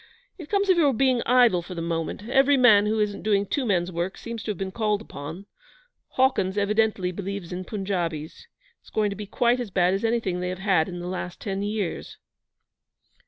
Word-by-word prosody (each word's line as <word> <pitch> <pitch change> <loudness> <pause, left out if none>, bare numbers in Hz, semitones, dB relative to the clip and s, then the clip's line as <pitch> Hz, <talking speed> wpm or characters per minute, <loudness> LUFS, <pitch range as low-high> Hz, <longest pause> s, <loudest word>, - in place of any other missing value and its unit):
It 320 - -9
comes 400 -1 +1
of 370 -2 +4
your 285 -6 +3
being 255 -1 +2
idle 240 -7 +5
for 180 +1 -9
the 165 - -4
moment. 165 +5 -3
Every 270 +2 +4
man 215 -5 +6
who 220 +1 0
isn't 205 -1 -1
doing 205 -2 +1
two 255 +6 -2
men's 180 -3 +1
work 175 +2 -3
seems 230 -1 -6
to 215 - -7
have 205 - -2
been 190 +1 -4
called 210 -1 0
upon. 175 -2 -8 0.7
Hawkins 235 -7 +2
evidently 205 -2 +1
believes 195 -1 -5
in 185 +1 -5
Punjabis. 180 - -4 0.3
It's - - -18
going 210 -1 0
to - - -4
be 205 +1 -7
quite 240 +4 +2
as 240 -4 -4
bad 180 -1 +2
as 195 - -2
anything 225 -6 0
they 180 0 -2
have 185 - -4
had 190 -4 +1
in 175 -1 -6
the 175 - -5
last 180 -1 -5
ten 195 -3 -3
years.' 205 -3 -3
200 Hz, 205 wpm, -25 LUFS, 180-230 Hz, 0.7 s, man